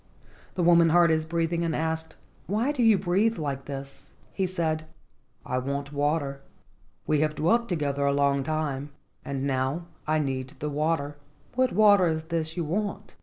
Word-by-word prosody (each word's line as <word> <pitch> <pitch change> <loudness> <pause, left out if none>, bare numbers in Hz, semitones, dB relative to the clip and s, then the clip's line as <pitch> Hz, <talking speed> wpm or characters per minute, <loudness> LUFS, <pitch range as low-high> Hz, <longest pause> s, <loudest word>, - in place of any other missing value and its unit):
The 180 - 0
woman 170 -1 +6
heard 170 0 +5
his 155 0 +1
breathing, 170 +1 -1
and 165 -2 -1
asked, 160 0 -2 0.3
"Why 220 +8 +1
do 285 -4 -2
you 225 -3 +6
breathe 195 +5 +1
like 140 -4 -3
this?" 140 -1 -8 0.2
He 190 -1 0
said: 160 -3 -1 0.6
"I 130 - -1
want 140 +2 -4
water. 145 -1 -1 0.6
We 150 - +2
have 155 0 +1
dwelt 235 +10 +2
together 140 -5 0
a - - +3
long 140 0 +2
time 145 -1 -2 0.3
and 135 -1 -3
now 135 +5 -1 0.2
I 155 0 +2
need 135 -3 -2
the 150 0 -3
water." 150 -1 -1 0.4
"What 255 0 +2
water 205 -2 +5
is 160 -1 -1
this 160 0 -3
you 170 - 0
want?" 205 +5 -3
160 Hz, 170 wpm, -27 LUFS, 140-175 Hz, 0.6 s, woman